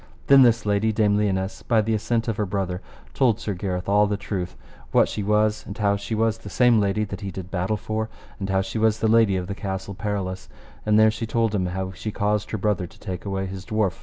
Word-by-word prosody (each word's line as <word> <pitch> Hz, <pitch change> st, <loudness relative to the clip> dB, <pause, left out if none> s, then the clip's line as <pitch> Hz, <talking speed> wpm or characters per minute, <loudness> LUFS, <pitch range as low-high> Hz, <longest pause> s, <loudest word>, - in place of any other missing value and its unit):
Then 140 Hz, -1 st, +7 dB
this 115 Hz, -3 st, +4 dB
lady, 105 Hz, +2 st, +2 dB
Dame 105 Hz, -1 st, +2 dB
Lionesse, 95 Hz, -1 st, -1 dB
by 115 Hz, -2 st, +2 dB
the 110 Hz, +1 st, +1 dB
assent 115 Hz, +2 st, 0 dB
of 110 Hz, -2 st, -1 dB
her 105 Hz, -, 0 dB
brother, 95 Hz, -2 st, -2 dB, 0.3 s
told 120 Hz, -5 st, +2 dB
Sir 110 Hz, -3 st, -3 dB
Gareth 90 Hz, -1 st, -3 dB
all 105 Hz, +1 st, +4 dB
the 100 Hz, 0 st, -1 dB
truth 95 Hz, -3 st, -4 dB, 0.3 s
what -, -, +5 dB
she -, -, -4 dB
was, 105 Hz, +1 st, +2 dB
and 100 Hz, -, -7 dB
how 100 Hz, -2 st, +2 dB
she 100 Hz, +2 st, -4 dB
was 115 Hz, 0 st, +1 dB
the 100 Hz, -, -9 dB
same 120 Hz, +2 st, +4 dB
lady 100 Hz, +1 st, +1 dB
that 105 Hz, -, -6 dB
he 100 Hz, -, -4 dB
did 95 Hz, -1 st, -7 dB
battle 95 Hz, +3 st, 0 dB
for, 110 Hz, +1 st, -3 dB, 0.3 s
and 100 Hz, -1 st, -3 dB
how 95 Hz, 0 st, +2 dB
she 110 Hz, -, -4 dB
was 110 Hz, 0 st, +2 dB
lady 110 Hz, -3 st, +4 dB
of 90 Hz, -1 st, -2 dB
the 100 Hz, -, -4 dB
Castle 100 Hz, -1 st, -4 dB
Perilous, 95 Hz, -4 st, -4 dB, 0.4 s
and 105 Hz, 0 st, +4 dB
there 110 Hz, 0 st, +6 dB
she 115 Hz, +1 st, -4 dB
told 115 Hz, -1 st, +1 dB
him 95 Hz, -3 st, 0 dB
how 95 Hz, +1 st, -3 dB
she 95 Hz, +4 st, -5 dB
caused 105 Hz, +1 st, 0 dB
her 110 Hz, -, -2 dB
brother 100 Hz, -3 st, 0 dB
to -, -, -19 dB
take 95 Hz, -3 st, -6 dB
away 95 Hz, -1 st, -2 dB
his 95 Hz, 0 st, -6 dB
dwarf. 105 Hz, -3 st, -1 dB
105 Hz, 240 wpm, -24 LUFS, 95-110 Hz, 0.4 s, Then